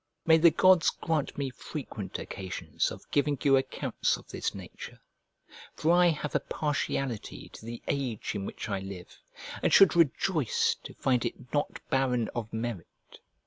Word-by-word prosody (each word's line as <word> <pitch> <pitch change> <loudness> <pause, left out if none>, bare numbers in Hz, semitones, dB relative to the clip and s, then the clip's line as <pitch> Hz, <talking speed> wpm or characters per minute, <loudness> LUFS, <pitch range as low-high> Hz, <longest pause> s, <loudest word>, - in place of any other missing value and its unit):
May 160 0 +6
the 170 +1 +8
gods 180 +2 +5
grant 160 -4 -2
me 140 -2 -2
frequent 125 - -6
occasions 90 -4 -3
of - - -9
giving 145 0 +2
you 140 -2 +5
accounts 135 - 0
of - - -16
this - - -3
nature! - - -9 0.8
for 160 - +2
I 175 0 +6
have 150 -3 -1
a - - +3
partiality 135 -5 -3
to - - -13
the 115 +1 -7
age 130 -6 -2
in 100 -2 -3
which - - -6
I 95 - -1
live, 95 -2 -9 0.5
and - - +2
should 195 -4 +7
rejoice 165 - +2
to - - -9
find 125 -3 +1
it 125 +1 -6
not 145 0 -1
barren 125 -4 +1
of 115 -2 -5
merit. 110 -6 -6
135 Hz, 160 wpm, -29 LUFS, 115-155 Hz, 0.8 s, the